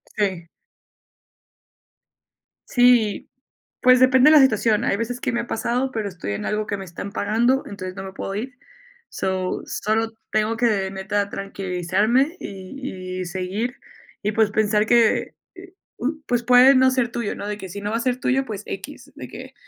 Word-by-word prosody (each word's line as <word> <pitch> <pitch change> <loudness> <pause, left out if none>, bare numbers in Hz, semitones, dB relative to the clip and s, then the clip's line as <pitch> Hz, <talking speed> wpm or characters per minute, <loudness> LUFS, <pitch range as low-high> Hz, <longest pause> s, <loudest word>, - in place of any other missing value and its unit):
Sí. 190 -5 -1 2.2
Sí. 245 -4 +3 0.5
Pues 255 0 +6
depende 260 +2 +6
la 305 -2 +8
situación. 225 -3 +3
Hay 200 - +1
veces 240 +3 -4
que - - -1
me 235 0 -1
ha 235 - -8
pasado, 250 +4 -1
pero 220 -4 -3
estoy 175 - -5
en 100 - -4
algo, 215 0 -1
que 205 - -2
me 195 - -7
están 185 +3 -7
pagando, 235 +7 +1
entonces, 185 -2 -7
no 190 - -6
me 190 - -7
puedo 195 0 -5
ir. 250 +4 -5 0.5
So, 185 -1 -2
solo 220 +2 -1 0.2
tengo 215 +1 0
que, 210 -5 +1
neta, 200 +1 -2
tranquilizarme, 195 - 0
y 190 -2 -7
y - - -3
seguir. 190 +7 -3 0.5
Y 210 - 0
pues, 220 -1 +2
pensar 210 0 +2
que, 235 -2 +3 0.2
eh, 370 0 -13 0.2
u 300 +5 -2
pues, 245 -1 0
puede 250 +3 +7
no 260 0 +5
ser 255 -2 +1
tuyo, 235 -4 -3
¿no? 205 - -6
De 210 0 -3
que 190 -2 -8
si 200 - -7
no 205 +1 -3
va 225 - 0
a - - -2
ser 250 0 -1
tuyo, 270 +1 +1
pues, 210 -4 -6
equis, - - -8
de - - -8
que, - - -10
215 Hz, 175 wpm, -22 LUFS, 195-245 Hz, 2.2 s, la